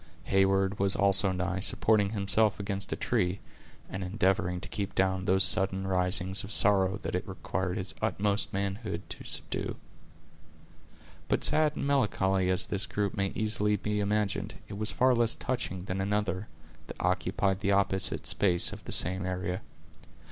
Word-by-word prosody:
Heyward 95 +1 +1
was 100 0 +4
also 100 -1 +4
nigh, 95 +1 -2
supporting 105 +1 +3
himself 100 0 +2
against 100 -1 -3
a - - 0
tree, 90 +2 -1 0.5
and 95 0 -5
endeavoring 95 -2 0
to 95 - -6
keep 100 -1 -5
down 95 -1 0
those 95 +1 +4
sudden 95 -1 +2
risings 95 0 +1
of 100 - -8
sorrow 95 -1 +3
that - - -4
it 90 - -3
required 95 -1 -3
his 90 -4 -1
utmost 100 0 -1
manhood 100 +2 -4
to - - -7
subdue. - - -3 1.5
But - - 0
sad 155 -1 +3
and - - -3
melancholy 95 -9 +1
as 90 -1 +1
this 100 0 -2
group 100 -2 -2
may 100 -1 0
easily 105 -1 +1
be 105 +1 -2
imagined, 105 -1 -1
it - - -8
was 110 0 +2
far 130 0 +2
less 115 -1 +3
touching 120 -8 -4
than 95 0 -3
another, 100 0 -2 0.4
that - - -9
occupied 90 +1 0
the 100 0 +1
opposite 95 -5 +1
space 85 +2 +2
of - - -10
the - - -7
same 95 +2 +3
area. 90 0 -3
95 Hz, 160 wpm, -29 LUFS, 95-105 Hz, 1.5 s, was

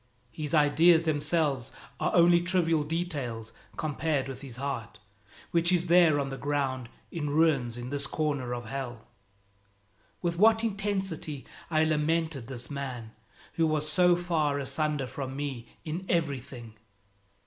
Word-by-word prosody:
His 150 +2 -2
ideas 160 +3 +5
themselves 150 -4 +1 0.3
are - - 0
only 170 0 +6
trivial 170 -3 +2
details 145 -9 -3 0.2
compared 155 -2 -1
with 135 -2 -7
his 135 -4 -8
heart 125 -5 -4 0.5
which 170 +1 +3
is 175 -1 +2
there 170 -4 +5
on 135 -1 -2
the 135 - -6
ground 135 -4 -1 0.2
in 150 -3 -3
ruins 145 -6 +2
in 120 +2 -6
this 140 -1 0
corner 145 -6 -1
of 120 -1 -4
Hell. 120 -2 -6 1.1
With 170 -1 -2
what 225 +2 +5
intensity 195 -9 -2 0.2
I 155 -2 +3
lamented 155 -3 0
this 125 +1 -5
man 130 -5 -5 0.4
who 165 -1 +2
was 155 -1 0
so 180 +2 +5
far 165 -5 0
asunder 145 +1 -1
from 135 +1 -6
me 135 -4 -4 0.2
in 165 +4 -4
everything! 135 -8 -2
150 Hz, 135 wpm, -29 LUFS, 135-165 Hz, 1.1 s, only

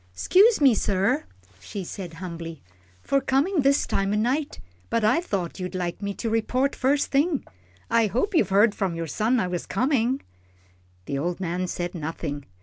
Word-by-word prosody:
"'Scuse 410 - +5
me, 275 -4 +6
sir," 195 - +1 0.3
she 190 - -6
said, 175 -1 -7
humbly, 165 -3 -7 0.4
"for 275 - +1
comin' 295 +7 +2
this 275 +1 +3
time 195 0 0
o' - - +1
night, 260 +8 0 0.3
but 230 -1 0
I 220 +10 +3
thought 195 - -3
you'd 185 0 -4
like 175 +1 -3
me 200 0 -2
to 235 - -4
report 250 +5 +1
first 275 +2 +1
thing. 290 +1 +1 0.4
I 230 -1 +3
hope 255 - -1
you've 225 - +3
heard 205 +2 +4
from 190 -5 -2
your 165 0 -3
son 220 - +1
I 185 - +1
was 180 -1 -4
comin'?" 255 +3 +1 0.8
The 140 - -2
old 175 +4 -2
man 180 0 -2
said 175 0 -3
nothing. 155 -3 -5
205 Hz, 175 wpm, -25 LUFS, 175-265 Hz, 0.8 s, me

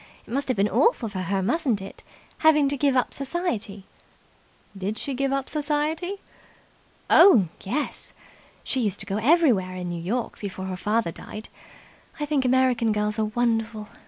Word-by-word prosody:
It - - -9
must 280 +1 +1
have 255 - 0
been 200 +1 +3
awful 240 - +2
for 195 -2 -5
her, 190 +1 -1
mustn't 240 - +1
it, 195 0 -10 0.4
having 300 -3 +5
to 285 - 0
give 280 -1 +1
up 250 - 0
society." 265 - -3 0.9
"Did 195 +3 -3
she 280 - -3
give 270 +1 -1
up 275 -1 -1
society?" 305 +5 -1 0.9
"Oh, 215 - +7
yes. 275 +10 -3 0.5
She 265 - -1
used 210 -5 -1
to - - -7
go 200 0 -2
everywhere 230 - +3
in 180 -1 -4
New 170 -1 -4
York 230 +8 -3
before 190 -2 -5
her 190 -1 -4
father 210 0 0
died. 215 +6 -9 0.7
I 295 - -1
think 290 -3 0
American 250 -3 +3
girls 210 +1 -1
are 215 - +2
wonderful. 225 -1 -1
230 Hz, 165 wpm, -25 LUFS, 200-280 Hz, 0.9 s, Oh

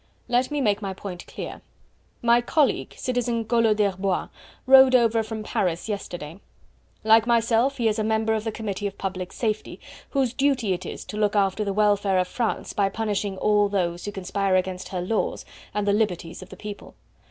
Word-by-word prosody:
"Let 245 +1 +1
me 295 -1 -1
make 210 -4 +1
my 195 -2 -4
point 180 -2 -8
clear. - - -7 0.6
My 235 0 +5
colleague, 285 +3 +1
Citizen 240 -2 -1
Collot 225 -2 +3
d'Herbois, 195 -2 0 0.4
rode 265 0 +8
over 230 -2 +4
from 220 0 -5
Paris 180 -4 -1
yesterday; 175 -5 -5 0.6
like 220 +1 +5
myself 235 +3 +2
he 235 -3 +1
is 215 0 0
a - - +1
member 220 0 +1
of 215 -1 -1
the 220 - -2
Committee 205 -2 -3
of 195 - -8
Public 185 -2 -4
Safety 215 -2 -3 0.3
whose 265 -4 0
duty 265 -8 +1
it 180 - -5
is - - -7
to 210 - -7
look 210 0 +1
after 200 +1 +2
the 200 - -1
welfare 205 -1 +2
of 180 0 +1
France 230 +1 -2
by 200 -1 +1
punishing 205 -2 -2
all 205 0 +3
those 175 -3 -1
who 205 - -3
conspire 195 0 -1
against 185 0 -1
her 180 -2 -3
laws 210 +5 -2 0.3
and 205 0 -2
the 200 - +4
liberties 180 -6 -1
of - - -11
the 190 - -11
people. 205 0 -9
210 Hz, 185 wpm, -24 LUFS, 195-230 Hz, 0.6 s, rode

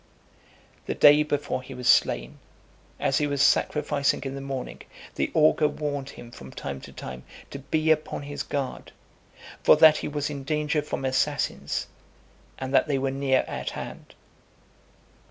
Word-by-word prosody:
XIX. - - -31
The - - -2
day 145 +1 +7
before 145 -3 -2
he 130 0 -10
was 125 -1 -4
slain, - - +3 0.6
as - - +1
he 150 - +1
was 140 -1 -2
sacrificing 140 0 +2
in 135 -1 -4
the 140 - -6
morning, 135 -2 -6 0.3
the - - -1
augur 155 0 +4
warned 145 -2 -4
him 120 -3 -11
from 65 - -11
time 70 0 -6
to - - -11
time 65 -1 -8 0.3
to 140 - -6
be 155 +3 0
upon 155 -2 -1
his 145 0 -5
guard, 140 -3 -4 0.7
for - - +7
that 155 -1 +7
he - - -4
was 145 0 -3
in 140 -2 -6
danger 150 +1 0
from 145 -2 -4
assassins, 130 0 -1 0.7
and 130 +1 -5
that 140 - +4
they 140 -2 +1
were 135 0 -1
near 135 -1 +1
at - - -4
hand. - - -9
140 Hz, 165 wpm, -26 LUFS, 130-150 Hz, 0.7 s, day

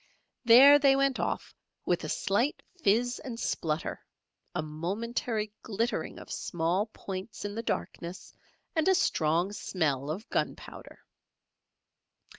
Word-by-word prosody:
There 265 +5 +9
they 275 -1 +5
went 275 -1 +2
off - - -2 0.3
with - - +1
a - - -4
slight 235 +9 0 0.2
fizz 240 +3 +2
and 240 -5 -7
splutter, 155 -7 -2 0.5
a - - 0
momentary 210 +7 -3
glittering 225 +3 -2
of - - -10
small 175 +5 -1
points 195 0 -7
in 205 - -3
the 225 - -3
darkness 180 -5 -4 0.4
and 320 +1 +2
a 380 - +5
strong 170 - +1
smell 150 -9 -1
of 190 +8 -4
gunpowder. - - -4
210 Hz, 120 wpm, -29 LUFS, 170-240 Hz, 0.5 s, There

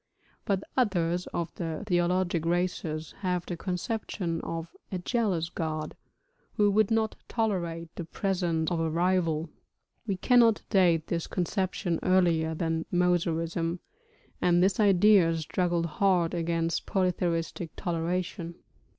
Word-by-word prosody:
But 195 -1 0
others 180 -7 +1
of 170 -1 -4
the 165 0 -4
theologic 175 -2 +1
races 165 -2 -1
have 180 -3 -1
the 175 - -4
conception 180 -1 -3
of 165 0 -5 0.2
'a 185 - -1
jealous 180 -4 0
god,' 155 -2 -4 0.6
who 205 -2 +3
would 215 0 +3
not 225 -1 +1
tolerate 170 -7 -2
the 175 - -6
presence 175 -3 -1
of 170 - 0
a 165 0 0
rival. 165 -2 +1 0.6
We 195 -3 -1
cannot 230 0 +4
date 175 -6 +4
this 170 -1 -2
conception 185 -1 -1
earlier 170 -4 +2
than 165 0 -1
Mosaism, 170 -1 0 0.6
and 175 0 +4
this 190 +1 +2
idea 195 -4 +5
struggled 170 +1 0
hard 175 +1 +1
against 165 -1 -1
polytheistic 175 -3 -1
toleration. 170 0 -2
175 Hz, 120 wpm, -28 LUFS, 165-185 Hz, 0.6 s, idea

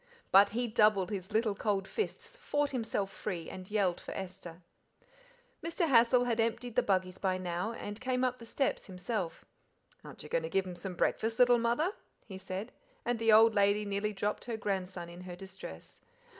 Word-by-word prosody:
But 200 +1 +8
he 240 +3 -1
doubled 210 -4 +3
his 190 0 -5
little 220 0 +2
cold 200 -1 -1
fists, 440 +3 -3
fought 290 - -1
himself 225 -6 -2
free, 180 -6 -4
and 185 0 -8
yelled 200 -5 +1
for - - -7
Esther. 180 -2 -7 1.0
Mr. 335 +1 0
Hassal 245 -1 +5
had 235 -2 0
emptied 230 +1 -1
the - - +5
buggies 185 -2 0
by 185 -1 +1
now, 180 +4 -2
and 205 -1 -6
came 255 0 0
up 255 0 0
the 230 - -10
steps 270 +4 -1
himself. 180 -1 -4 0.6
"Aren't - - -10
you - - -10
going - - +1
to 485 - -4
give 195 - +1
them 180 - -6
some 180 +1 -6
breakfast, 225 +5 0
little 245 -1 +6
mother?" 240 - +1 0.3
he 190 -3 -8
said, 190 +4 -5 0.3
and 240 -1 0
the 225 -1 +4
old 220 +1 +7
lady 205 +1 +3
nearly 200 +1 -1
dropped 205 +1 -2
her 235 -2 -3
grandson 190 -4 -3
in 170 +1 -10
her 180 -1 -7
distress. 190 +1 -10
210 Hz, 185 wpm, -32 LUFS, 190-235 Hz, 1.0 s, But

